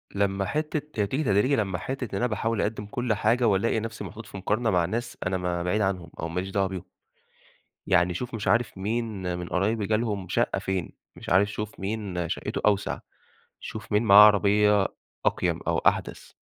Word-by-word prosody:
لمّا 100 -1 +1
حِتّة 150 -2 -2
هي 100 - +1
تيجي 140 +8 -1
تدريجي 115 +5 +3
لمّا 95 -5 -1
حِتّة 130 +5 -4
إن - - 0
أنا 125 - +1
باحاول 110 0 -1
أقَدّم 105 -1 -2
كل 120 +2 -1
حاجة، 115 +3 +2
وألاقي 105 +3 +2
نفسي 115 0 -6
محطوط 115 +1 -8
في 100 - -9
مُقارنة 110 +4 0
مع 90 -4 +2
ناس 115 +6 -4
أنا 95 0 0
ما 90 -1 -2
بعيد 105 +4 0
عنهم، 90 -4 -1
أو 85 - -2
ماليش 90 +3 -3
دعوة 95 -1 +1
بيهم. 95 -2 -6 1.0
يعني 90 -1 +3
شوف 125 +6 -5
مش 105 -3 -5
عارف 115 0 +2
مين 100 -4 -2
من 90 - -5
قرايبي 105 +3 0
جالهم 110 -4 -1
شقة - - +1
فين، 95 -3 -3 0.2
مش - - -8
عارف 100 +3 +4
شوف 105 0 -6
مين 95 -4 -3
شقته - - -3
أوسع، 100 -1 +1 0.6
شوف 110 0 -8
مين 105 +2 +3
معاه 105 -1 +9
عربية 105 -1 +4 0.4
أقيَم - - +1
أو - - +2
أحدث. - - 0
105 Hz, 185 wpm, -26 LUFS, 95-115 Hz, 1.0 s, معاه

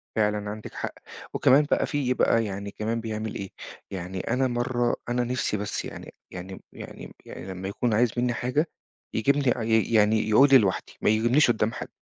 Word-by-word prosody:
فعلًا 105 -1 0
عندِك 105 +1 -7
حق، - - -4 0.4
وكمان 140 +3 +5
بقى - - +3
في 140 -4 0
بقى 115 -2 +2
يعني 100 0 -5
كمان 115 +3 -2
بيعمل 110 -1 -4
إيه، 95 -1 -5 0.4
يعني 95 0 -5
أنا 130 +6 0
مَرّة 120 0 0
أنا 120 0 +1
نِفسي 120 -3 -1
بس 105 0 -3
يعني - - -9 0.2
يعني 95 +1 -8
يعني - - -10
يعني - - -9
لمّا 95 0 -6
يكون 110 +4 -1
عايز 120 +3 +3
مني 120 0 +1
حاجه، 130 +7 0 0.5
يجيبني 140 +6 +2 0.3
ي 110 +1 +2
يعني 110 0 +3
يقول 135 +7 +6
لي 135 - +10
لِوَحدِي، 100 -6 -1
ما - - +3
يقولّيش 120 +5 +4
قدّام 110 -1 0
حد، - - -6
110 Hz, 180 wpm, -26 LUFS, 105-125 Hz, 0.5 s, لي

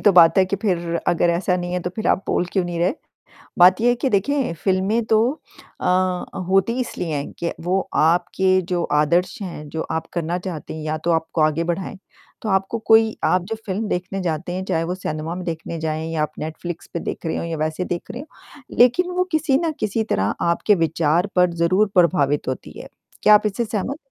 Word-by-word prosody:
तो 205 - +5
बात 170 0 +7
है 190 - +6
कि 200 - -1
फिर 170 -4 -1
अगर 170 0 +3
ऐसा 180 +1 +1
नहीं 175 0 -4
है 180 - -1
तो 180 - -4
फिर 220 - -2
आप 190 - +2
बोल - - +1
क्यों 190 -3 +1
नहीं 175 -1 -4
रहे? 180 - +1 0.6
बात 180 +3 +7
ये 240 - +3
है 245 - +4
कि 255 +2 -1
देखिए 245 +3 +1
फ़िल्में 195 +6 0
तो 215 - +6 0.6
अ, - - -5 0.6
होती 195 +4 +3
ही 255 - -2
इसलिए 175 -9 -3
हैं 140 0 -4
कि 170 - -2
वो 185 +3 0
आपके 180 +3 +3
जो 175 -1 +1 0.2
आदर्श 175 +4 +1
हैं, 160 -5 -7
जो 160 +2 -3
आप 160 0 -2
करना 170 0 -2
चाहते 175 -5 -6
हैं 155 - -6
या 155 0 -1
तो 170 - +1
आपको 160 0 0
आगे 155 +2 +2
बढ़ाएँ। 180 +3 -3 0.4
तो 220 - -3
आपको 195 +3 0
कोई 220 0 +5
आप 180 0 +3
जो 225 +3 -4
फ़िल्म 205 +2 -2
देखने 185 +1 -3
जाते 165 0 -2
हैं, 185 +1 -3
चाहे 165 -3 0
वो 180 +2 -2
सिनेमा 160 -2 -4
में 180 0 -6
देखने 165 0 -5
जाएँ 160 0 -2
या 155 -2 0
आप 150 - -2
नेटफ्लिक्स 160 +2 -6
पे - - 0
देख - - -5
रहे 160 - -1
हो - - -3
या 165 -1 -3
वैसे 155 +3 -2
देख 175 -1 -5
रहे 245 - -6
हो, 290 - -9 0.5
लेकिन 250 +10 +4
वो 365 - +3
किसी 310 -3 +2
न 320 - 0
किसी 215 +1 0
तरह 95 +1 +1 0.2
आपके 205 +4 +3
विचार 165 +4 +1
पर 180 -1 +4
ज़रूर 185 +5 +2
प्रभावित 150 -6 +2
होती 130 - -5
है। - - -9 0.3
क्या 210 - +7
आप 210 0 +4
इससे 210 +3 -1
सहमत? 225 +6 -3
180 Hz, 220 wpm, -21 LUFS, 165-200 Hz, 0.6 s, बात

